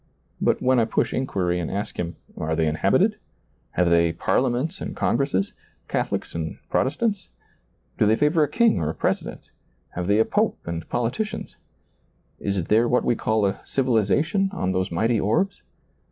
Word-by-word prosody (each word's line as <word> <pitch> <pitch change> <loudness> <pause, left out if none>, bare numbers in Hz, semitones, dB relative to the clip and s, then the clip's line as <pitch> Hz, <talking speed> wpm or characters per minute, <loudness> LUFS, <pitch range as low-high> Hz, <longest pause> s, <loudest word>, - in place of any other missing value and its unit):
But - - +1
when 130 0 +4
I 115 - +3
push 110 - 0
inquiry 90 -9 0
and 85 - -3
ask 100 +2 -4
him, 85 0 -3 0.2
Are 80 +1 -2
they 80 0 +1
inhabited? 75 0 +2 0.6
have 90 -1 +2
they 85 0 +4
parliaments 135 - 0
and - - -5
congresses. 135 -9 0 0.3
Catholics - - -2
and 80 -1 -4
Protestants? 200 - 0 0.7
do 105 - +4
they 110 +1 +4
(aver 155 +2 +3
a 150 - +2
king 230 +7 +3
or 75 - -1
a 80 - -4
president? - - -3 0.4
have 90 0 -4
they 100 +1 +3
a 110 - +4
pope - - +1
and 85 -1 -5
politicians? 120 - -2 0.8
is 100 -3 -1
there 110 +7 +3
what 125 - +2
we 120 - +2
call 110 -2 +1
a 100 0 -1
civilization 135 - +1
on 95 - -1
those 95 0 0
mighty 110 +7 +1
orbs 175 - 0
110 Hz, 165 wpm, -24 LUFS, 90-135 Hz, 0.8 s, when